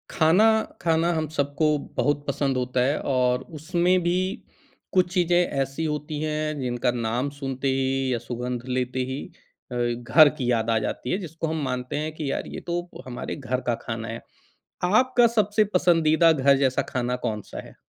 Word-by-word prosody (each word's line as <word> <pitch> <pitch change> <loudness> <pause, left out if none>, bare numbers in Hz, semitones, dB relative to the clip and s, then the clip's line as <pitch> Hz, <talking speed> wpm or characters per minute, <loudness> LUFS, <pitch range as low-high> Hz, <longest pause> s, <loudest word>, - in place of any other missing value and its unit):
खाना, 165 +7 +4 0.4
खाना 165 +1 +2
हम 160 -1 -1
सबको 145 +2 +1 0.2
बहुत 145 0 +1
पसंद 140 -1 0
होता 125 0 0
है 145 +3 +1
और 125 -2 +1 0.2
उसमें 175 +3 +2
भी 175 +1 +1 0.8
कुछ 180 -1 +2
चीज़ें 175 -2 +3
ऐसी 135 +2 -2
होती 150 0 -3
हैं, 155 -1 -2
जिनका 125 0 0
नाम 120 +3 -1
सुनते 135 -1 -3
ही 135 0 0
या - - 0
सुगंध 120 +1 -4
लेते 130 0 -1
ही 135 - -4 0.5
अ, - - -4
घर 120 +5 +4
की 125 -2 0
याद 115 -1 +1
आ 115 - +3
जाती 125 - -3
है, - - +1
जिसको 165 -4 -5
हम 160 0 -2
मानते 125 +1 -3
हैं 155 +1 -2
कि 155 -3 -3
यार, - - -3
ये - - -6
तो 175 0 -2 0.2
हमारे 125 -1 -5
घर 130 -2 -3
का 120 - +2
खाना 115 0 -5
है। 115 +1 -6 0.6
आपका 240 +6 +4
सबसे 215 -2 +2
पसंदीदा 165 -2 +4
घर 140 -2 +4
जैसा 135 -2 +1
खाना 125 -1 -1
कौन-सा 105 -3 -4
है? - - -14
140 Hz, 175 wpm, -25 LUFS, 125-160 Hz, 0.8 s, खाना